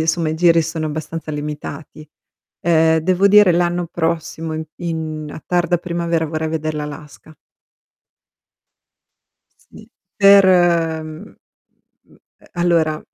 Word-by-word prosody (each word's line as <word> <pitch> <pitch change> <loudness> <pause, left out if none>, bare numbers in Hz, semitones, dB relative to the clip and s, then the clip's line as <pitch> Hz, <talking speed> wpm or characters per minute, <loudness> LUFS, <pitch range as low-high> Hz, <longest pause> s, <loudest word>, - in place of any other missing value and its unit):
insomma 160 0 0
i 155 - -2
giri 165 0 +4
sono 160 0 -4
abbastanza 155 +1 -6
limitati. 150 0 -7 0.5
Ehm, 160 -1 +3
devo 185 +4 +2
dire 205 -2 +6
l'anno 175 0 0
prossimo 165 -1 -3
in 160 0 -4
in 160 -3 -5
a 155 - -10
tarda 175 -1 +1
primavera 170 -2 -2
vorrei 155 +1 -3
veder 155 -1 -3
l'Alaska. 150 +1 -9 2.4
Sì, - - -14 0.3
per 200 -1 +7
mhmm, 165 -4 +1
mhmm, - - -23 0.2
ehm, - - -22
allora 165 -3 +1
160 Hz, 115 wpm, -18 LUFS, 155-175 Hz, 2.4 s, per